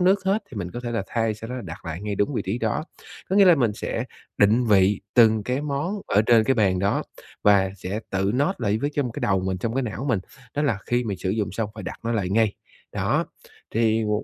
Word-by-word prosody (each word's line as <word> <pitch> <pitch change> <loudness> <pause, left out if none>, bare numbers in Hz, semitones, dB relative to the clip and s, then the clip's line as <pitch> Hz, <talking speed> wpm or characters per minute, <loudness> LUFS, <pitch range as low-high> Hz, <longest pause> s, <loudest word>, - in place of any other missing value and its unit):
nước 190 +2 +3
hết 200 +3 +1
thì 125 - -9
mình 90 -3 -4
có 120 - -6
thể 120 -1 -4
là 115 -3 -1
thay, 115 -2 0
sau 115 +2 -9
đó 125 - -4
là 125 - -5
đặt 80 -4 -9
lại 85 +1 -5
ngay 105 -1 -2
đúng 100 +8 0
vị - - -1
trí 100 +6 -2
đó. 115 +6 -1 0.5
Có 190 - +2
nghĩa 200 - +8
là 180 -2 +8
mình 120 -8 +1
sẽ 115 +2 -3 0.3
định 110 +4 +4
vị 100 -1 +4
từng 110 -2 +5
cái 125 +5 -1
món 145 -1 -2 0.2
ở 105 - +3
trên 115 0 +5
cái 135 - +3
bàn 100 -5 +2
đó 100 +2 +1 0.4
và 100 -2 +4
sẽ 100 +3 -4
tự 95 +1 0
note 145 +9 +1
lại 105 -2 0
với 145 +5 -1
trong 145 -3 +1
m - - -4
cái - - -7
đầu 95 -2 +2
mình, 95 0 -2
trong 115 +5 -2
cái 135 - +1
não 110 +1 -4
mình, 110 -7 +2 0.3
đó 145 - 0
là 120 -9 +1
khi 120 0 +1
mình 100 -4 -3
sử 95 - -2
dụng 105 -4 -1
xong 110 +1 -2
phải 105 - -7
đặt 95 - -6
nó 115 - 0
lại 100 -5 0
ngay. 110 0 +2 0.4
Đó, - - 0 0.4
thì, 110 0 +2
ừm, 105 - -1
110 Hz, 265 wpm, -24 LUFS, 100-125 Hz, 0.5 s, nghĩa